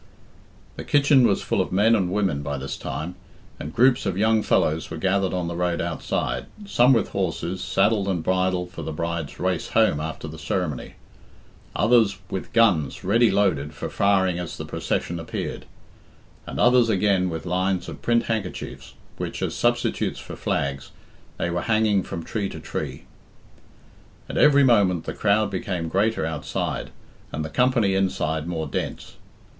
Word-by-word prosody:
The - - -5
kitchen 140 -3 +4
was 100 - 0
full - - +1
of - - -3
men 105 +5 +4
and 95 -4 0
women 95 -8 0
by 70 0 -3
this 70 0 -5
time, 80 +3 -5 0.5
and 75 - -6
groups 125 +5 +3
of 95 -1 -1
young 110 +1 +3
fellows 80 -5 +1
were - - -5
gathered 95 +2 +1
on 90 -2 -2
the 85 - -4
road 85 -1 0
outside, 85 -2 -2 0.2
some 125 -9 +4
with 115 -6 +3
horses, 95 -1 -2
saddled 100 0 +2
and 90 -4 -1
bridled 90 0 0
for 85 - -7
the 80 0 -4
bride's 85 -1 -4
race 90 -2 -1
home 110 -9 +3
after 80 0 -5
the 80 +1 -9
ceremony; 80 -2 -3 0.8
others 110 -2 +4
with 95 - -4
guns 100 -11 +2
ready 115 +5 +4
loaded 80 -7 +1
for - - -5
firing 95 -3 +2
as 90 -2 -5
the - - -5
procession 85 -1 -2
appeared; 80 - -5 0.8
and - - -5
others 125 -1 +5
again 95 -2 +2
with 80 -1 -5
lines 90 0 0
of - - -8
print 115 0 +2
handkerchiefs, 110 -5 -5 0.2
which, - - -4
as - - -2
substitutes - - 0
for - - -8
flags, 70 0 -2 0.5
they 85 - -1
were 90 0 -1
hanging 110 -1 +2
from 85 -2 -6
tree 100 0 -3
to - - -8
tree. - - -5 1.2
At - - -5
every 140 -1 +6
moment 100 -9 +3
the - - -4
crowd 105 0 +2
became 90 -3 -3
greater 105 0 +1
outside, 75 -3 -3 0.4
and 80 +1 -3
the - - -5
company 125 -5 +2
inside 80 -5 0
more 80 -2 -2
dense. 70 - -5
95 Hz, 165 wpm, -24 LUFS, 85-110 Hz, 1.2 s, every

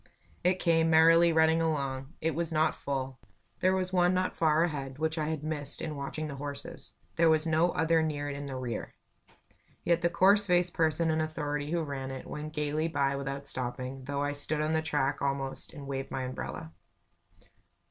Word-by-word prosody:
It 180 +1 +3
came, 165 -2 +2
merrily 165 +1 +6
running 160 0 +4
along. 140 -3 -2
It 160 0 0
was 165 +2 -2
not 155 -1 +2
full. 135 -2 -4 0.4
There 185 +1 +3
was 185 0 -2
one 180 0 +3
not 185 0 0
far 160 0 +3
ahead, 135 -5 -3
which 160 +1 -1
I 155 - -1
had 155 -2 -3
missed 150 -2 -2
in 155 - -4
watching 145 +2 -4
the 140 -2 -7
horses; 140 0 -8 0.2
there 165 0 +5
was 160 0 +3
no 165 +2 +3
other 160 +1 +3
near 145 -2 -2
it 145 - -4
in 140 0 -6
the 135 - -5
rear. 125 -3 -5 0.9
Yet 170 -1 +2
the 170 - +2
coarse 200 +4 +4
faced 180 -1 +2
person 160 0 +1
in 160 0 +1
authority 150 -2 -3
who 170 0 0
ran 135 -3 -4
it, 135 -1 -7
went 150 +1 -6
gaily 150 +1 -1
by 140 -3 0
without 140 0 -4
stopping, 130 0 -4
though 140 0 -2
I 145 - 0
stood 145 +1 0
on 155 +1 0
the 160 - +2
track 145 -3 0
almost, 135 -1 -1
and 145 -4 -9
waved 135 0 -4
my 130 - -3
umbrella. 125 -10 -6
155 Hz, 195 wpm, -30 LUFS, 140-165 Hz, 0.9 s, merrily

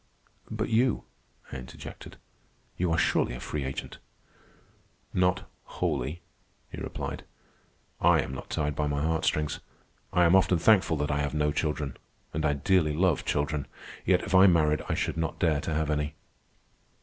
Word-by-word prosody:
"But - - -2
you," 120 +1 +2 0.5
I - - -4
interjected. 65 0 -10 0.6
"You 90 -2 0
are 80 - +2
surely 80 - +2
a - - -6
free 75 -2 -3
agent." 65 0 -5 1.1
"Not 90 0 +1 0.2
wholly," 75 +8 -2 0.5
he - - -7
replied. - - -5 0.8
"I - - +5
am 65 - -6
not 65 - -7
tied 75 -2 -1
by 75 0 0
my 70 0 -1
heartstrings. 75 -2 0 0.5
I 90 0 +4
am 85 +3 +5
often 95 -1 +4
thankful 95 -3 +4
that 75 +1 -1
I 70 - 0
have 75 +1 -1
no 75 0 +2
children, 75 -2 -2 0.4
and 80 +1 -1
I 75 - +2
dearly 75 0 +2
love 90 -3 +2
children. 70 0 -1 0.4
Yet 90 0 +3
if - - -5
I 95 +1 +8
married 75 -4 +3
I - - +1
should - - -1
not 80 0 -2
dare 80 -6 +2
to 80 - -3
have 80 -1 0
any." 75 0 -1
75 Hz, 160 wpm, -28 LUFS, 75-90 Hz, 1.1 s, I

